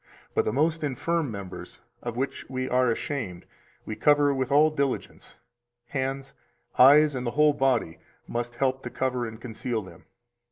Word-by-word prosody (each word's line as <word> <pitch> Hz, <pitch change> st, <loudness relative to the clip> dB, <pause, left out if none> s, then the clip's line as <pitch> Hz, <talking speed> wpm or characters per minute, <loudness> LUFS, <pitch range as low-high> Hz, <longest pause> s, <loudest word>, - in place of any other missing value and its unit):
But -, -, +1 dB
the -, -, 0 dB
most 155 Hz, +5 st, +1 dB
infirm 150 Hz, +3 st, -1 dB
members, 100 Hz, -4 st, -8 dB, 0.2 s
of 120 Hz, -1 st, -5 dB
which 135 Hz, +2 st, -3 dB
we 130 Hz, 0 st, -3 dB
are 125 Hz, 0 st, +2 dB
ashamed, 115 Hz, -, -3 dB, 0.4 s
we 110 Hz, -, -4 dB
cover 145 Hz, +1 st, +4 dB
with 130 Hz, -1 st, -2 dB
all 150 Hz, +2 st, +5 dB
diligence; 140 Hz, -3 st, -3 dB, 0.5 s
hands, 135 Hz, 0 st, -3 dB, 0.5 s
eyes, 145 Hz, +3 st, +7 dB
and 125 Hz, -2 st, -3 dB
the 120 Hz, -, -4 dB
whole 150 Hz, 0 st, +5 dB
body 125 Hz, -12 st, 0 dB, 0.3 s
must 120 Hz, 0 st, -4 dB
help 130 Hz, +1 st, 0 dB
to -, -, -6 dB
cover 125 Hz, -2 st, -1 dB
and 110 Hz, 0 st, -9 dB
conceal 120 Hz, -1 st, -4 dB
them. 95 Hz, -, -14 dB
130 Hz, 160 wpm, -26 LUFS, 120-145 Hz, 0.5 s, eyes